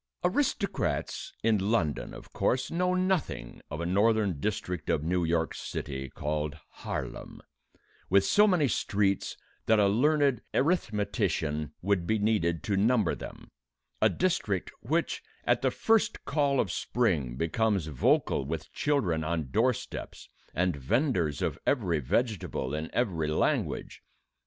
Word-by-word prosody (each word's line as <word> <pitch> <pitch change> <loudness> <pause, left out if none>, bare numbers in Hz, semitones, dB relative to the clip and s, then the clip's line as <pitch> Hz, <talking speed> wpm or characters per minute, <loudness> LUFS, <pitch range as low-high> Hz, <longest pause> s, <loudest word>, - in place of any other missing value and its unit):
Aristocrats 200 -1 -1
in 110 -2 +3
London, 95 -7 0
of - - -12
course, 130 +1 0
know 180 +2 +1
nothing 185 - -1
of 75 - -5
a 85 - -2
northern 100 -2 +2
district 90 -5 -3
of 75 - +1
New 90 +2 +1
York 80 0 0
City 65 -1 -5
called 75 +1 -3 0.2
Harlem, - - -5 0.7
with 100 +1 +5
so 210 - +5
many 175 -8 +3
streets 100 -3 0 0.3
that 110 - +5
a 105 - +5
learned 140 +3 +3
arithmetician 100 - 0
would 95 -3 +1
be 110 - +2
needed 100 -6 +1
to 100 - 0
number 110 0 +3
them: - - -9 0.5
a - - +6
district 105 - 0
which, 160 +9 -1 0.2
at - - +2
the - - +3
first 225 -1 +1
call 140 -2 +1
of 95 - +1
spring, 80 - 0
becomes 95 - +1
vocal 75 -5 +2
with - - -5
children 100 - +1
on 80 -4 -2
door 120 - +4
steps 120 - -7 0.3
and 90 -1 +1
venders 90 - 0
of - - -1
every 95 - +2
vegetable 80 - -1
in 80 +1 -3
every 90 -11 0
language. 75 - -1
100 Hz, 135 wpm, -29 LUFS, 80-125 Hz, 0.7 s, a